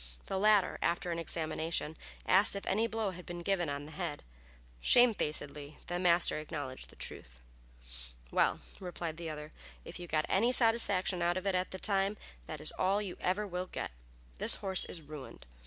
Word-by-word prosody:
The 190 - -2
latter, 210 -2 +4
after 170 +1 0
an 170 - -2
examination, 160 -1 -2 0.3
asked 195 +2 +5
if 200 - -5
any 215 +4 +1
blow 220 -3 -1
had 180 0 -9
been 175 0 -7
given 175 -4 +1
on 140 0 -4
the 155 - -10
head. 165 -3 -4 0.6
Shamefacedly 150 - +2
the 175 0 -2
master 175 -3 +4
acknowledged 145 -4 -5
the - - -15
truth. - - -5 0.9
"Well," - - +2 0.2
replied 175 -3 -5
the 170 -1 -5
other, 150 0 -7 0.3
"if 175 - -8
you 175 - -7
got 155 -2 +1
any 230 +6 +3
satisfaction 205 -7 +3
out 175 +1 +2
of 185 - -4
it 195 - +1
at 185 0 0
the 190 - -6
time 195 +1 +1 0.3
it 155 - -6
is 150 - -1
all 195 +2 +3
you 200 -4 -4
ever 190 +4 0
will 180 -1 -4
get. - - -5 0.5
This - - +5
horse 190 -2 +4
is 165 - -8
ruined. 145 -2 -10
175 Hz, 180 wpm, -33 LUFS, 155-195 Hz, 0.9 s, asked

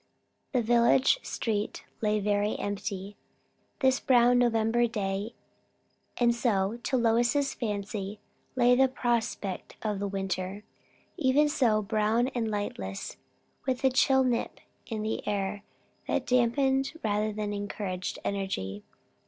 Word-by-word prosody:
The 250 -4 +1
village 240 - +4
street 210 -2 -3 0.2
lay 210 -1 +2
very 205 +1 0
empty, 200 0 -4 0.6
this 260 -1 +4
brown 245 -1 +4
November 235 0 +2
day; 205 0 -3 0.8
and 240 -1 +4
so, 225 -2 0
to 260 - 0
Lois's 240 +4 +2
fancy, 205 -2 -4 0.4
lay 245 -1 +5
the 265 +1 +5
prospect 235 -6 -2
of 210 -3 -1
the 200 - -1
winter. 195 0 -3 0.5
Even 290 +1 +3
so; 230 -7 +2
brown 220 +4 +1
and 235 -4 -2
lightless, 100 - -4 0.5
with 255 0 -1
a 265 - +4
chill 265 +1 +4
nip 245 -2 -1 0.3
in 220 -2 -3
the 220 - -2
air 200 0 -1 0.5
that - - 0
dampened 265 +3 +2
rather 210 0 0
than 210 0 -3
encouraged 200 -2 -4
energy. 105 - -3
220 Hz, 120 wpm, -28 LUFS, 205-245 Hz, 0.8 s, lay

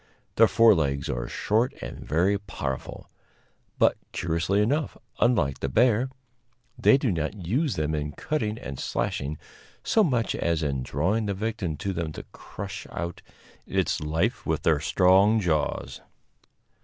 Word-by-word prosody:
Their - - +6
forelegs 80 -12 +3
are - - -3
short 115 +6 0
and - - -8
very 95 +6 +1
powerful; 65 -9 -5 0.7
but, - - +4 0.2
curiously 85 +3 0
enough, 140 +9 0 0.2
unlike 90 - +2
the 70 - -2
bear, 120 - +3 0.7
they 130 +1 +5
do 135 -5 0
not 85 +3 -3
use 135 - 0
them 75 0 -1
in 75 -1 -2
cutting 110 - -2
and 70 - -7
slashing 75 +3 -2 0.5
so 220 - +3
much 125 - +1
as 85 -1 0
in 70 -3 -1
drawing 95 - 0
the 100 - -1
victim 100 -6 -3
to 100 +5 -3
them 85 -3 -3
to - - -7
crush 100 0 -8
out 85 0 -5 0.5
its - - 0
life 75 +2 -1
with - - -1
their 80 -3 +3
strong 95 +7 +4
jaws. 80 -7 -1
95 Hz, 145 wpm, -26 LUFS, 75-110 Hz, 0.7 s, Their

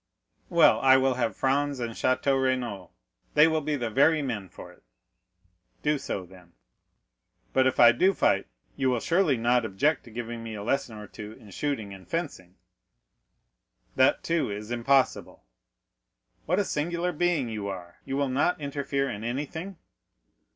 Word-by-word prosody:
"Well, - - +5
I 130 0 +6
will 130 0 +2
have 120 -5 -1
Franz 140 +1 0
and 120 -1 -3
Château 130 +3 +1
Renaud; 125 -8 -2 0.5
they 150 +1 +7
will 160 -1 +1
be 150 0 -1
the 120 -5 -3
very 150 +5 +3
men 105 -8 -4
for - - -12
it." - - -21 1.0
"Do 150 -1 +1
so, 95 -7 -4
then." 90 -1 -18 1.0
"But 130 0 +4
if 130 - -1
I 120 -1 +9
do 185 +12 +3
fight, - - +2 0.3
you 135 -2 +1
will 125 -2 +1
surely 165 -2 +2
not 120 +1 +2
object 110 +9 0
to - - -12
giving 115 0 -6
me 115 -1 -6
a 100 - -6
lesson 120 -1 -1
or 105 - -8
two 105 +1 -9
in 105 -2 -15
shooting 110 -4 -3
and 95 -1 -13
fencing?" 140 - -5 1.4
"That, 130 0 +3
too, 165 -6 0
is 105 +2 -6
impossible." 130 +3 +1 1.0
"What 180 +4 +1
a 205 - +1
singular 170 +3 -1
being 170 -5 0
you 105 -3 -4
are!—you 95 +8 -6
will 140 -1 0
not 145 +7 +1
interfere 140 -1 -2
in 105 -4 -5
anything." 150 +10 -4
130 Hz, 160 wpm, -27 LUFS, 110-145 Hz, 1.4 s, I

